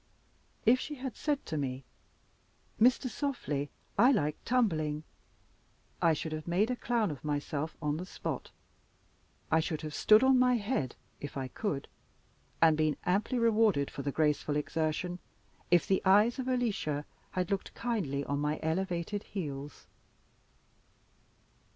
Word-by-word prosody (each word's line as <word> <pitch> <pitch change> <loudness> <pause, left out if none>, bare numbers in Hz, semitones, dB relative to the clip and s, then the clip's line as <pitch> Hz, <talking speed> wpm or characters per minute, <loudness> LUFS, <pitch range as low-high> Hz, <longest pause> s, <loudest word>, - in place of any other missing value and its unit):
If 250 +3 +6
she 300 - -5
had 260 -2 -5
said 295 -2 -1
to 155 - -3
me, 135 -2 -3 1.0
"Mr. 255 +3 +5
Softly, 225 - -2 0.3
I 245 +5 +7
like 150 - +1
tumbling," 160 -12 +1 1.0
I 165 - +5
should 155 +1 -3
have 155 0 -5
made 195 +8 +2
a - - 0
clown 235 -6 0
of 140 - -8
myself 150 +1 -2
on 150 0 0
the 180 - -5
spot. - - -5 1.0
I 160 - +5
should 160 -1 -2
have 155 -2 -6
stood 215 - +6
on 265 -1 +5
my 250 0 +5
head 205 - -1 0.2
(if 145 0 -6
I 130 -1 -3
could), 145 - -3 0.8
and 160 -1 +6
been 155 -1 +1
amply 205 +7 +1
rewarded 220 - +3
for - - -5
the 140 +1 -2
graceful 150 0 +1
exertion, 160 +4 -1 0.5
if 175 -1 +5
the 190 - +2
eyes 210 +7 +5
of 260 - -3
Alicia 210 - 0 0.3
had 180 0 -1
looked 195 - -2
kindly 175 - -1
on 140 0 -1
my 150 +1 -1
elevated 175 +4 -1
heels! 145 -9 -6
170 Hz, 145 wpm, -31 LUFS, 150-230 Hz, 1.0 s, I